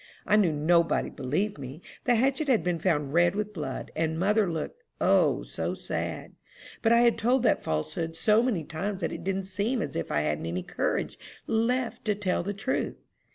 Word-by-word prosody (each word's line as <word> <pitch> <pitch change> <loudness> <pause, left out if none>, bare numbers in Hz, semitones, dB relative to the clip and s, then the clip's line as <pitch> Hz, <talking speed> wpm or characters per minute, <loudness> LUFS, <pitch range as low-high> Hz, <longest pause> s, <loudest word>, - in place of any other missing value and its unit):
I 210 - +4
knew 200 -6 +4
nobody 165 +3 +2
believed 150 +8 -2
me. 135 +3 -7 0.3
The 245 - +4
hatchet 270 +5 +1
had 250 -5 +3
been 175 -2 0
found 150 -6 0
red 175 +2 +4
with 210 0 -2
blood, 150 -7 -5
and 160 0 0
mother 205 +2 +2
looked, 165 - -5 0.2
O, - - +3
so - - -3
sad! - - -4 0.5
but 225 - +3
I 235 0 +6
had 235 -1 +4
told 245 +3 +2
that 230 - +3
falsehood 80 - -2
so 215 +5 +4
many 230 -10 0
times 185 +6 -4
that - - -1
it - - -6
did 195 +1 -1
seem 205 +7 -1
as 145 - -3
if 85 - -3
I 75 - +2
hadn't 75 +1 -1
any 90 +2 -2
courage - - -2 0.3
left 235 +2 0
to 210 -2 +1
tell 195 -3 0
the 195 +4 -3
truth. 240 +7 -1
190 Hz, 195 wpm, -28 LUFS, 155-225 Hz, 0.5 s, I